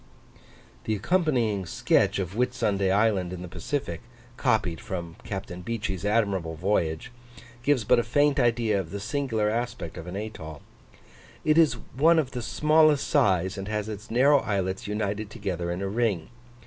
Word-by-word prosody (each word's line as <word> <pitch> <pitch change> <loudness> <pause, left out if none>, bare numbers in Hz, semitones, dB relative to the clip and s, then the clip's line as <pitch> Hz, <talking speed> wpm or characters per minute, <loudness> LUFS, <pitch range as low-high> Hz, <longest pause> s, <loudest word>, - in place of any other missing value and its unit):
The 110 - 0
accompanying 115 - +1
sketch - - +2
of 95 -2 -3
Whitsunday 110 -5 0
Island 100 -3 +2
in 90 -1 -6
the - - -6
Pacific, 85 - -4 0.3
copied 110 - 0
from, 85 -3 -5
Capt. 95 -2 -5
Beechey's 100 -5 -3
admirable 100 -6 0
Voyage, 80 0 -1 0.5
gives 130 -2 +2
but 125 +3 +4
a - - +1
faint 145 +5 +2
idea 115 -4 +2
of 90 -4 -5
the 100 - -5
singular 115 -1 -1
aspect 115 -8 -3
of 85 - -8
an 90 - -6
atoll: 80 -8 -7 0.8
it 155 - +4
is 155 -6 +4 0.2
one 165 +5 +5
of 140 -5 +1
the 125 - -4
smallest 150 +4 +3
size, 95 - +2
and 95 - -5
has 105 -1 -2
its 105 -1 -7
narrow 140 +5 +5
islets 95 -4 -2
united 105 0 -2
together 95 -6 -4
in 90 +3 -3
a - - -1
ring. 100 -5 -1
105 Hz, 160 wpm, -26 LUFS, 95-125 Hz, 0.8 s, one